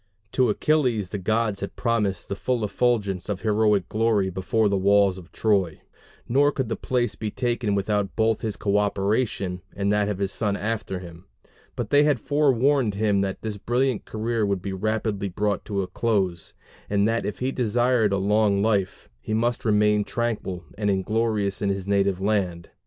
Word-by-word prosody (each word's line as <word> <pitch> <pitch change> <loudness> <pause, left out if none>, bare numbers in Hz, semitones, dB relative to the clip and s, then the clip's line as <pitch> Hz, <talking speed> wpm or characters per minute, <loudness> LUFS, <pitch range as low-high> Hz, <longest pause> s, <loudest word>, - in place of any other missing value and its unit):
To 130 -3 +2
Achilles 120 - +1
the 100 - -4
gods 110 +1 0
had 100 - -6
promised 105 -6 -1
the 100 - -3
full 120 +1 -1
effulgence 105 -5 0
of 100 -2 -3
heroic 105 -3 +2
glory 110 -3 +1
before 100 +4 +1
the 100 - +1
walls 100 -1 +3
of 90 -1 -15
Troy; 100 -7 +1 0.5
nor 140 +4 +3
could 130 -5 -3
the - - -1
place 125 -1 -1
be 110 - -4
taken 120 -2 -1
without 100 0 -1
both 110 -1 +1
his 110 -2 -3
coöperation 100 -1 0
and 100 +1 0
that 105 0 +1
of 105 - -2
his 100 0 -1
son 100 -1 -1
after 110 -3 -3
him. 85 -2 -11 0.5
But - - -4
they 145 - +6
had 145 -4 +3
forewarned 140 -4 +2
him 100 -1 +2
that 95 -1 -3
this 105 -2 -4
brilliant 125 +2 0
career 110 +1 -2
would 100 -3 -1
be 100 - -3
rapidly 105 0 -1
brought 100 +2 -1
to 100 -2 -1
a - - -5
close; 95 -4 -1 0.3
and 100 0 +2
that 115 +1 0
if 105 - -4
he 130 +1 -1
desired 120 -2 +2
a 100 - +1
long 100 0 +2
life, 100 -4 0
he 110 +12 -3
must 120 +2 0
remain 105 -1 +3
tranquil 105 -6 -3 0.2
and 105 -1 +1
inglorious 100 +1 0
in 100 - +1
his 95 -1 -3
native 100 -2 +1
land. 95 -4 -1
105 Hz, 180 wpm, -24 LUFS, 100-115 Hz, 0.5 s, they